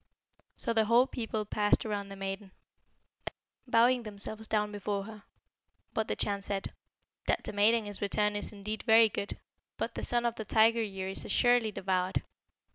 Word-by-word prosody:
So 230 - 0
the 220 -1 +3
whole 235 +3 +5
people 225 -5 -3
passed 210 +1 +1
around 205 -2 -3
the 195 - -8
maiden, 195 +1 -5 1.2
bowing 245 +1 +4
themselves 215 0 -6
down 210 -1 0
before 205 -1 -3
her. 215 0 -10 0.7
But 220 - -1
the - - -1
Chan 200 -1 -1
said, 195 0 -4 0.5
'That - - +1
the - - -6
maiden 215 +2 +4
is 205 -1 -5
returned 210 +1 +1
is 205 - -3
indeed 210 +1 -4
very 225 -1 +6
good. 200 0 -4 0.4
But - - -2
the - - -5
Son 240 0 0
of 235 - +1
the 220 - -3
Tiger 225 +2 +4
year 195 -3 -4
is 190 - -3
assuredly 245 -3 +3
devoured.' 185 -1 -1
210 Hz, 170 wpm, -31 LUFS, 200-225 Hz, 1.2 s, very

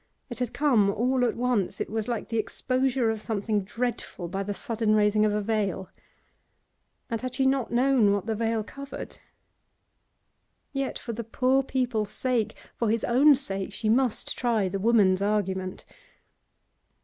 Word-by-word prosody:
It 240 - -4
had 245 -2 -1
come 245 -9 +3
all 250 +5 +1
at 245 - +1
once; 235 -6 0
it - - -2
was 220 0 -3
like 235 -3 -3
the 230 -1 0
exposure 255 0 0
of 220 -1 -4
something 210 -2 -1
dreadful 230 -4 -4
by 195 +2 -3
the 200 +1 -3
sudden 215 +1 0
raising 210 0 +3
of 210 - +2
a 210 0 -1
veil. 200 -4 -1 1.2
And 230 - -2
had 255 0 -4
she 265 - +1
not 265 -2 +1
known 245 -3 +3
what 200 -1 0
the 225 - -1
veil 225 0 0
covered? 280 +5 -9 1.5
Yet 275 -1 -2
for 235 - -6
the 235 +2 -4
poor 255 +4 +2
people's 250 -6 -1
sake, 245 -3 -1 0.2
for 230 - 0
his 225 +1 0
own 275 +5 +6
sake, 195 -7 -4
she 215 +2 -2
must 245 0 +1
try 230 -5 +1
the 195 +1 -3
woman's 200 -3 +4
argument. 190 -2 -1
225 Hz, 160 wpm, -27 LUFS, 205-250 Hz, 1.5 s, own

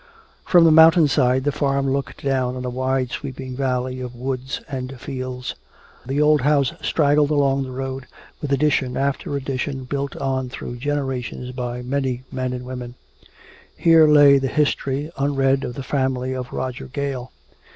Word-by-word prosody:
From 175 -2 +6
the 165 - +6
mountain 160 0 +7
side 130 -2 +2
the 145 - +1
farm 140 -1 0
looked 135 0 -3
down 130 -2 0
on 125 0 -5
a 125 - -3
wide 130 0 -1
sweeping 130 -2 -6
valley 130 -1 -2
of 125 -1 -6
woods 130 +1 -4
and 130 -1 -6
fields. 130 -2 -5 0.5
The 135 +2 -1
old 150 -1 +4
house 140 -1 +2
straggled 145 -1 +2
along 140 -2 +2
the 130 - -8
road, 135 0 -5 0.3
with 145 - -4
addition 135 -3 +1
after 140 +1 -1
addition 135 0 -3
built 140 +2 -3
on 130 -1 -2
through 120 -1 -7
generations 130 -2 -3
by 125 -1 -4
many 130 -1 -2
men 130 -1 -2
and 125 0 -5
women. 125 -1 -7 0.8
Here 165 -2 +6
lay 145 -2 +7
the 135 - -1
history, 145 +1 0
unread, 135 -1 +2
of 120 - -5
the 135 - -5
family 130 -1 -1
of 130 -1 -5
Roger 130 -1 -4
Gale. 135 -2 -4
135 Hz, 160 wpm, -22 LUFS, 130-140 Hz, 0.8 s, mountain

